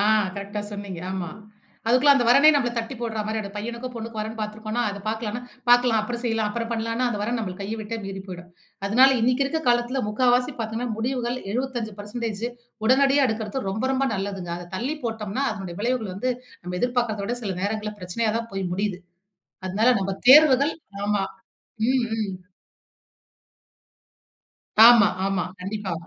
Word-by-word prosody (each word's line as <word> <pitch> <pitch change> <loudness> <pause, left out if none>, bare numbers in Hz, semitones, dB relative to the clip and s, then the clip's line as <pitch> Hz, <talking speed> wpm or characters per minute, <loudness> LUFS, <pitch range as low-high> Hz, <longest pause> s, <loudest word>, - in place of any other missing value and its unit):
ஆ - - +3 0.3
கரெக்ட்டா 200 +1 -4
சொன்னீங்க 200 -4 -6
ஆமா. 185 -3 -3 0.6
அதுக்குள்ள 255 +4 +6
அந்த 260 -3 +2
வரனே 280 +5 +8
நம்மள 255 -4 +2
தட்டி 230 +3 -3
போடுற 225 -2 -2
மாரி 220 +1 -2
அந்த 200 -2 -6
பையனுக்கும், 235 +4 -5
பொண்ணுக்கும் 225 -1 -5
வரேன் 220 +1 -5
பார்த்துருக்கோம்னா 215 +2 -3
அத 200 0 -7
பார்க்கலாம்னா 220 +1 -3 0.3
பார்க்கலாம். 245 -2 +5
அப்புறம் 235 +2 -4
செய்யலாம். 225 -2 0
அப்புறம் 230 +2 -3
பண்ணலாம்னா, 230 +2 -1
அந்த 210 - -3
வரன் 235 +3 -1
நம்மள 195 -5 -3
கைய 205 +3 -3
விட்டே 215 +2 -4
மீறி 195 0 -5
போய்டும். 180 -1 -8 0.4
அதனால 255 +7 +6
இன்னைக்கு 250 +4 +2
இருக்கற 315 +4 -1
காலத்துல 240 +2 +2
3/4 245 +3 +2
பார்த்தீங்கணா 225 +2 -3
முடிவுகள் 245 +1 -1 0.2
75% 245 -3 -2
பெர்ஸண்டேஜ் 220 0 -4 0.4
உடனடியா 275 +2 +5
எடுக்கிறது 220 +1 -3
ரொம்ப 220 +5 -2
ரொம்ப 270 +1 +1
நல்லதுங்க. 195 -3 -4
அத 175 0 -10
தள்ளி 270 +9 -2
போட்டோம்னா, 225 +2 -2
அதனுடைய 190 -4 -7
விளைவுகள் 230 -4 -1
வந்து 255 +7 -1 0.3
நம்ம 180 +1 -4
எதிர்பார்க்காதத 240 -4 0
விட 240 +3 -2
சில 195 -4 -2
நேரங்கள்ல 210 +1 -2
பிரச்சனையா 200 +5 -1
தான் 230 0 -6
போய் 190 -2 -3
முடியுது. 195 0 -2 0.7
அதனால 210 +6 +2
நம்ம 195 0 -1 0.2
தேர்வுகள் 280 0 +7 0.3
ஆமா, 205 -1 +1 0.7
ம், 255 -2 +2
ம். 200 -3 -2 2.5
ஆமா, 235 -4 +8 0.2
ஆமா. 195 -2 0 0.2
கண்டிப்பா. 195 0 -4
225 Hz, 155 wpm, -24 LUFS, 205-245 Hz, 2.5 s, வரனே